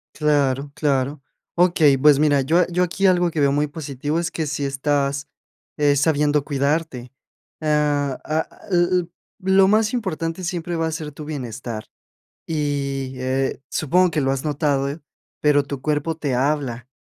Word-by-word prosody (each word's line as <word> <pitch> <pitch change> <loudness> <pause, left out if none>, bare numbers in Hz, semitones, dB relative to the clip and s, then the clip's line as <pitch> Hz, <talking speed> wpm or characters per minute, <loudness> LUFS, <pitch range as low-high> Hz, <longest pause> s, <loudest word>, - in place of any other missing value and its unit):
Claro, 145 -2 +1
claro. 140 -1 0 0.3
Okey, 170 -5 +4
pues, 145 +1 +5
mira, 145 -2 +3
yo 160 +7 +2
a 175 - +3
yo 180 +1 +1
aquí 180 +3 -1
algo 180 -2 +3
que 155 - -3
veo 140 -1 +3
muy 145 +1 +1
positivo 145 +1 -3
es 170 - -2
que 160 - -2
sí 145 0 -3
estás, 140 +1 -1 0.5
eh, 145 -1 +3
sabiendo 150 -1 +2
cuidarte. 140 -3 -1 0.5
Ah, 145 -3 +1
ah, 155 +1 -1 0.2
l 175 -1 +4 0.2
l 170 - -10 0.3
lo 190 0 +4
más 215 +2 +2
importante 180 -6 -3
siempre 175 -1 -3
va 165 0 0
a - - -2
ser 155 -2 -5
tu 150 +1 -9
bienestar. 120 -6 -5 0.6
Y, 140 -3 -2
eh, 130 +2 -1
supongo 180 +5 +2
que 155 -2 0
lo 135 0 +1
has 135 +2 -3
notado, 145 0 0 0.4
pero 145 -1 +4
tu 140 -1 -6
cuerpo 150 +3 -1
te 145 -5 -2
habla. 130 -3 -1
150 Hz, 160 wpm, -22 LUFS, 140-165 Hz, 0.6 s, pues